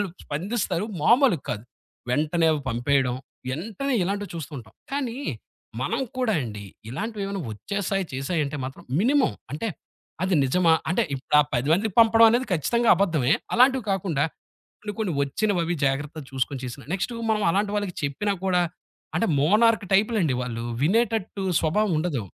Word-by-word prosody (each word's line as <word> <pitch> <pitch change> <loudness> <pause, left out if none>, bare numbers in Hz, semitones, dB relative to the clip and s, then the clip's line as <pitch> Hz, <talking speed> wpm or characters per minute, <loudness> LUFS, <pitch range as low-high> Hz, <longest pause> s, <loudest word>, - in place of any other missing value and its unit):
వాళ్ళు 205 - 0 0.2
స్పందిస్తారు 190 +4 -2 0.2
మామూలుగా 235 - +4
కాదు. 105 - -4 0.5
వెంటనే 155 +5 +2
అవి 150 - -1
పంపేయడం, 125 +1 +1 0.4
ఏంటనే 225 - -3
ఇలాంటివి 200 +1 -2
చూస్తుంటాం. 140 -8 -7 0.2
కానీ 260 -4 -2 0.7
మనం - - -1 0.2
కూడా 230 -5 +1
అండి, 105 -3 -6 0.3
ఇలాంటివేవైనా 200 - -4
వచ్చేసాయి, 195 - -2
చేసాయి 135 +6 -1
అంటే 145 +1 -5
మాత్రం, 130 +1 -8 0.2
మినిమమ్ 270 +5 +3 0.2
అంటే 185 +10 -2 0.5
అది 185 -1 +1
నిజమా 165 +5 +3 0.2
అంటే 180 - +2
ఇపుడా 135 +2 +2 0.2
10 125 +4 0
మందికి 200 +3 +1
పంపడం 225 0 +7
అనేది 245 +2 +1
ఖచ్చితంగా 235 - +1
అబద్ధమే. 160 -8 +2 0.2
అలాంటివి 255 -1 +4
కాకుండా 170 -7 0 0.6
కొన్ని 210 -1 -5
కొన్ని 195 -6 0
వచ్చినవవి 175 +3 0
జాగ్రత్తలు 145 +2 -2
చూసుకొని 130 0 -2
చేసిన, 125 +2 -7
నెక్స్టు 235 +5 -2 0.2
మనం 210 -1 +1
అలాంటి 200 +3 0
వాళ్ళకి 205 -4 -3
చెప్పినా 200 +9 -1
కూడా 180 -1 +3 0.5
అంటే 230 - +2
మోనార్క్ 210 +6 +4
టైప్‌లండి 200 - +2
వాళ్ళు. 115 -2 -4 0.2
వినేటట్టు 210 +1 +1 0.2
స్వభావం 190 +5 +1
ఉండదు. 150 - -1
180 Hz, 140 wpm, -25 LUFS, 145-215 Hz, 0.7 s, పంపడం